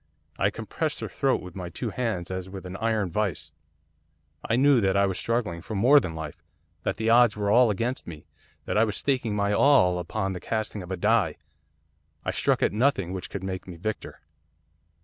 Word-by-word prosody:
I - - +3
compressed - - -3
her - - -3
throat - - 0
with 90 -1 -10
my 90 -2 -5
two 110 +7 -4
hands 105 -8 -2
as 95 0 -4
with 95 -1 -8
an 90 +1 -7
iron 110 -5 0
vice. 80 -6 -2 0.9
I 115 - 0
knew 135 -1 +5
that 95 -1 +2
I 100 - +4
was 95 -2 -2
struggling 110 -8 -1
for 105 +4 -6
more 130 +9 +6
than 85 -11 -5
life, 80 0 -7 0.4
that - - -2
the 110 +1 +1
odds 120 -3 +5
were 100 -1 0
all 120 +1 +6
against 115 +5 -2
me, 75 -3 -9 0.4
that - - +1
I - - +6
was 105 -2 -1
staking 125 -6 0
my 100 0 +1
all 100 -9 +4
upon 95 +2 -2
the 90 - -5
casting 110 -1 -3
of 90 - -9
a 95 - -3
die, 105 -4 +2 0.9
I - - 0
stuck - - +1
at - - +2
nothing 105 -6 +1
which 95 -1 -5
could 100 - -6
make 95 -1 -5
me 90 - -8
victor. 105 +6 -5
100 Hz, 205 wpm, -26 LUFS, 90-115 Hz, 0.9 s, more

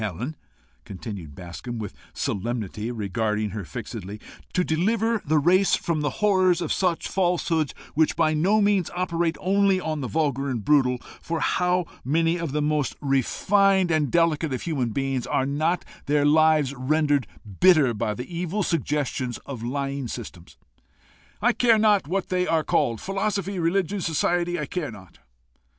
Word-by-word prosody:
Helen," 110 - -4 0.5
continued 95 -7 -8
Bascombe 90 - -7
with 105 -3 -5 0.2
solemnity, 110 0 -3
regarding 105 -1 -1
her 105 0 -5
fixedly, 95 +6 -7 0.3
"to 180 - +1
deliver 220 +7 +1
the 155 +2 +1
race 185 +6 +4
from 165 -3 -2
the 145 - 0 0.2
horrors 185 -3 +4
of 170 - -1
such 180 -3 0
falsehoods, 175 -4 0 0.2
which 155 +1 +2
by 155 - +2
no 190 +8 +3
means 200 -4 +2
operate 170 -2 0
only 195 0 +2
on 155 -4 -3
the 130 - -3
vulgar 140 -2 0
and 115 -6 -3
brutal, 130 -4 +3 0.2
for 165 - -3
to - - -1
how 180 0 +1 0.2
many 165 +5 +1
of 165 -4 -3
the 150 +1 0
most 150 -2 0
refined 185 - +2
and 155 -4 +1
delicate 165 -3 +2
of 130 - -3
human 140 -8 -1
beings 135 +1 -2
are 130 - +1
not 155 +5 0 0.2
their 145 0 +2
lives 155 -2 +4
rendered 145 -1 +1 0.3
bitter 155 -9 +5
by 105 -1 -2
the 125 - -5
evil 180 +4 -1
suggestions 145 -5 -1
of 130 -5 -7
lying 135 +2 -3
systems 100 -7 -9 0.9
I 240 +1 +4
care 230 -2 +4
not 210 -6 +3
what 190 +3 -2
they 180 0 0
are 160 -1 +2
called 115 -5 +1
philosophy, 195 -1 -2
religion, 185 +3 0
society, 175 +2 0
I 150 - -2
care 160 +1 -3
not? 100 -6 -13
155 Hz, 160 wpm, -25 LUFS, 125-180 Hz, 0.9 s, bitter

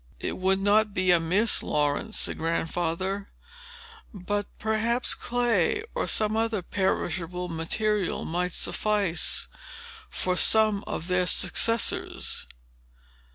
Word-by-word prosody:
"It - - -5
would 190 +1 +2
not 205 +1 +2
be 185 0 +2
amiss, 180 +6 +3
Laurence," 150 +9 -1
said - - -1
Grandfather; 170 +4 -2 0.8
"but 205 0 -3
perhaps 225 +3 0
clay, 240 - 0
or - - -2
some 215 0 +1
other 225 -3 0
perishable 180 -2 -2
material, 190 +5 -1
might 180 +2 -2
suffice 205 -5 0 0.6
for 180 0 -1
some 215 +1 +4
of 165 - -5
their 180 -1 +1
successors. 230 +4 +2
195 Hz, 105 wpm, -26 LUFS, 175-215 Hz, 0.8 s, some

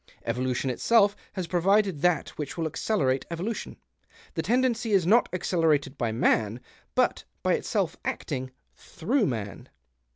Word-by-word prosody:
Evolution 130 +1 -1
itself 205 - +3 0.2
has 185 -3 -3
provided 185 -1 +2
that 180 -3 +2
which 150 +1 -6
will 165 - -1
accelerate 145 -5 0
evolution. 185 +7 -4 0.6
The - - -1
tendency 240 -2 +1
is 190 -4 +4
not 225 +7 +4
accelerated 160 -6 +1
by 120 -4 -1
man, 110 -1 +1 0.4
but - - +2 0.2
by - - +3
itself - - -1
acting 130 0 -3 0.2
through 225 - -1
man." 110 -6 -5
170 Hz, 130 wpm, -27 LUFS, 130-205 Hz, 0.6 s, is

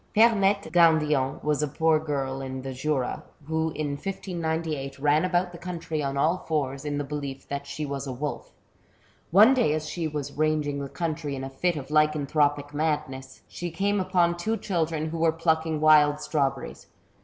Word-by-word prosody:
Pemette 205 -4 +4
Gandillon 150 -5 +3
was 150 -1 +1
a 150 - +1
poor 160 +2 +2
girl 135 -3 -3
in 130 -1 -5
the 135 0 -5
Jura, 130 -1 -1 0.2
who 160 +1 0
in 155 -1 -2
1598 160 -4 -3
ran 145 +3 +3
about 180 0 +1
the 170 - -10
country 165 -4 -4
on 140 -1 -2
all 165 +6 +2
fours, 140 -3 -2
in 145 -1 -2
the 145 - -1
belief 140 -1 -6
that 140 0 -4
she 140 +2 -4
was 140 -1 -4
a - - -3
wolf. 145 +4 -5 0.8
One 215 +9 +7
day 245 - +2
as 155 0 -4
she 165 0 -3
was 145 -2 -4
ranging 150 -1 0
the 140 -1 -5
country 155 -3 -3
in 135 - -5
a 135 - -6
fit 175 +6 0
of 140 -2 -6
lycanthropic 145 -1 +2
madness, 150 -3 -3
she 175 - -5
came 200 +4 0
upon 180 -2 +2
two 220 +6 -1
children 160 -5 -1
who 165 - -4
were 165 0 +4
plucking 160 -1 0
wild 150 -1 +5
strawberries. 145 -3 -2
155 Hz, 180 wpm, -26 LUFS, 140-165 Hz, 0.8 s, One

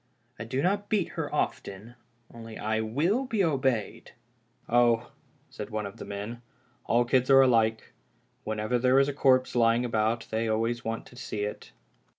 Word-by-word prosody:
I 110 - -5
do 130 +5 -2
not 205 +2 0
beat 205 -5 +1
her - - -5
often, 100 +5 -3 0.4
only 115 -1 -9
I 110 +1 -1
will 160 - 0
be 220 -6 0
obeyed." 130 - -1 0.3
" - - -40
Oh," 120 0 +2 0.4
said - - -7
one 110 -1 -3
of 100 - -8
the - - -8
men, 105 +4 -6 0.2
" 120 -1 -38
all 120 +1 +3
kids 130 +1 +1
are 135 0 +8
alike. 115 -4 +2 0.5
When 110 0 -3
ever 110 +3 0
there 130 +2 +3
is 135 0 +4
a 145 - -2
corpse 130 -2 +2
lying 115 0 +3
about 115 0 0
they 110 +1 -1
always 115 +2 -1
want 115 0 -4
to - - -16
see 110 -4 -5
it." 105 - -6
120 Hz, 180 wpm, -28 LUFS, 110-130 Hz, 0.5 s, are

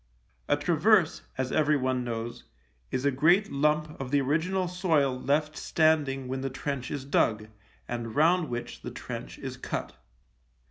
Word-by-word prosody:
A 145 - +3
traverse, 170 +3 +3 0.2
as 130 0 -1
everyone 135 -5 +2
knows, 120 0 -5 0.4
is 130 - -2
a 140 - +4
great 175 +10 +3
lump 150 +2 0
of 130 - -4
the 145 +1 +3
original 165 +7 0
soil 165 -7 +1
left 150 +4 0
standing 150 -6 +1
when 130 +1 -3
the 135 - -2
trench 130 -2 -4
is 140 -2 -4
dug, 110 -5 +1 0.4
and 120 -2 -4
round 165 +1 +3
which 120 0 -5
the - - -5
trench - - -7
is - - -6
cut. - - -4
145 Hz, 150 wpm, -28 LUFS, 130-155 Hz, 0.4 s, a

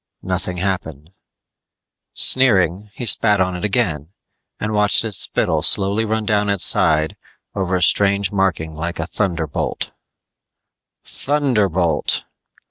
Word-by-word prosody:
Nothing 90 -1 -4
happened. 85 -5 -4 1.0
Sneering, 100 -6 +3
he 120 - -6
spat 105 -2 +3
on 95 -1 0
it 90 - -7
again 90 - -1 0.5
and 110 0 -3
watched 105 +1 +3
his 110 -3 -2
spittle - - +1
slowly 100 +3 +2
run 110 0 -2
down 105 -1 0
its 100 -2 +2
side 80 -1 +2 0.4
over 95 -1 -2
a 90 - +1
strange 100 0 +2
marking 90 -5 -1
like 85 +2 -5
a 80 - -3
thunderbolt 85 -6 -3 1.1
Thunderbolt! 105 - 0
95 Hz, 120 wpm, -18 LUFS, 85-105 Hz, 1.1 s, Sneering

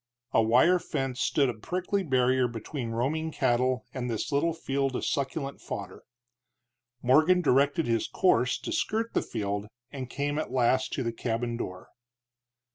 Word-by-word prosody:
A - - +4
wire 125 +11 +5
fence 135 -5 -3
stood 140 -2 +2
a 125 - -1
prickly 180 - -2
barrier 130 -5 +2
between 120 +2 -5
roaming 145 +8 -1
cattle 125 -1 +1
and 125 -2 -3
this 115 +5 -2
little 145 +4 +2
field 135 -4 -1
of - - -2
succulent 140 0 -2
fodder. - - -7 1.0
Morgan 155 +8 +5
directed 145 +3 +3
his 115 -1 0
course 125 -9 +2
to - - -5
skirt 230 -8 -1
the - - +2
field, 105 -2 -3 0.2
and 130 -3 -6
came 145 +3 -2
at - - -4
last 130 +1 +2
to 130 - -1
the 115 -1 -2
cabin 115 0 -2
door. 90 -6 -6
130 Hz, 155 wpm, -28 LUFS, 120-150 Hz, 1.0 s, wire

